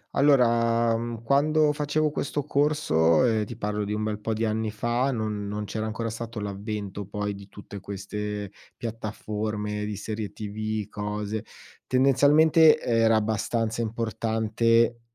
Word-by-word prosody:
Allora, 115 -4 +4
mhmm, 115 0 -5
quando 150 +4 +3
facevo 150 +1 0
questo 145 0 -2
corso 135 - +3
e 110 -3 +1
ti 115 +2 -8
parlo 105 -1 -2
di 105 - -3
un 105 0 -1
bel 105 -1 -2
po' 110 +1 -3
di 110 +1 0
anni 110 0 -1
fa, 120 +5 0
non 105 -3 -3
non 105 +1 -3
c'era 110 +2 -3
ancora 115 +1 -3
stato 115 0 -5
l'avvento 100 0 -5
poi 105 0 -3
di 100 0 -11
tutte 100 0 -10
queste 100 +1 -5 0.2
piattaforme 105 -2 -4
di 105 -1 -4
serie 105 -1 -5
TV, 110 0 -4
cose. 105 +1 -4 0.4
Tendenzialmente 150 +5 +5
era 115 -1 +3
abbastanza 110 +1 -1
importante 115 +1 +1
110 Hz, 140 wpm, -26 LUFS, 105-120 Hz, 0.4 s, Tendenzialmente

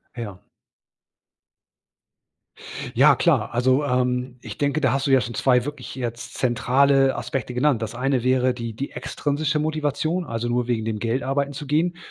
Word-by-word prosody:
Ja. 105 -6 -6 2.6
Ja - - +6
klar, - - +1
also, 130 +4 +2
ähm, 125 -1 0
ich 105 -4 -8
denke, 145 +2 0
da 130 -5 +3
hast 135 +1 0
du - - +1
ja 135 - +6
schon 120 +2 -5
2 125 +1 +2
wirklich 145 -4 -7
jetzt 120 -2 -5
zentrale 135 +3 +3
Aspekte 125 +1 -4
genannt. 125 -1 +2
Das 110 +1 -4
eine 130 0 0
wäre 130 0 +2
die 115 -2 -5
die 140 +5 -5
extrinsische 150 +1 -2
Motivation, 155 +3 -1
also 115 -2 -3
nur 120 0 0
wegen 115 -3 -1
dem 110 -1 -2
Geld 120 +4 -1
arbeiten 140 +1 -1
zu 145 +2 -7
gehen. 165 +5 +1
130 Hz, 165 wpm, -23 LUFS, 120-140 Hz, 2.6 s, Ja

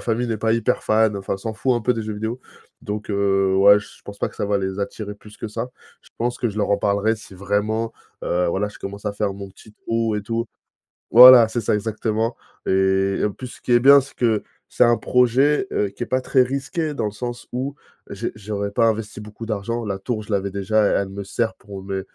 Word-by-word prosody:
famille 120 +1 -1
n'est 110 - -1
pas 110 +1 +1
hyper 115 +2 0
fan, 110 -1 +2
enfin 95 0 -3
s'en 110 +3 -5
fout 130 +2 +1
un 120 - -1
peu 125 +3 +2
des 115 - -3
jeux 105 0 -5
vidéo. 110 +4 -4 0.4
Donc, 105 +1 -5
heu, 95 -1 +2
ouais 100 +1 +7
je - - -15
pense 100 0 -10
pas - - -1
que - - -18
ça 105 - -2
va 100 -1 +1
les 95 0 -3
attirer 105 +1 -4
plus 105 0 -15
que 110 - -6
ça. 115 +4 -5 0.3
Je - - -22
pense 120 +1 -1
que 120 - 0
je 105 - -8
leur 105 -1 0
en 100 - +4
parlerai 100 +2 +1
si 100 -2 -13
vraiment, 105 +4 -1 0.3
heu, 90 0 0
voilà 105 +4 -1
je - - -14
commence 100 +2 -7
à 100 - -1
faire 100 -1 -2
mon 100 -1 -8
petit 105 +2 -17
trou 115 0 -2
et 105 - -2
tout. 115 +2 -2 0.6
Voilà 125 -1 +10
c'est 120 +1 -2
ça 105 - 0
exactement. 110 +2 -1 0.3
Et 95 0 +1
en 105 - -3
plus 125 - -8
ce - - -13
qui 125 - -1
est 120 - +6
bien 140 +2 +8
c'est 135 +2 -11
que 115 -4 +1 0.3
c'est - - +5
un 120 0 +4
projet, 130 +8 +2
heu, 100 -1 0
qui 100 - -9
est - - -2
pas 130 0 0
très 130 - +2
risqué 140 +4 -2
dans 135 - -2
le 105 - -1
sens 120 +3 -6
où 135 +3 -3 0.3
j'ai - - -4
j'aurais 100 -1 -4
pas 115 +3 +2
investi 110 -1 -2
beaucoup 105 +2 -9
d'argent, 115 +2 -3
la 100 -2 -3
tour 110 +1 -3
je 105 - -8
l'avais 100 0 0
déjà 100 +2 +1
et - - +2
elle 100 -1 -1
me 100 +1 -6
sert 115 +3 -1
pour 100 -1 -10
mes 95 -1 -3
110 Hz, 245 wpm, -22 LUFS, 100-120 Hz, 0.6 s, Voilà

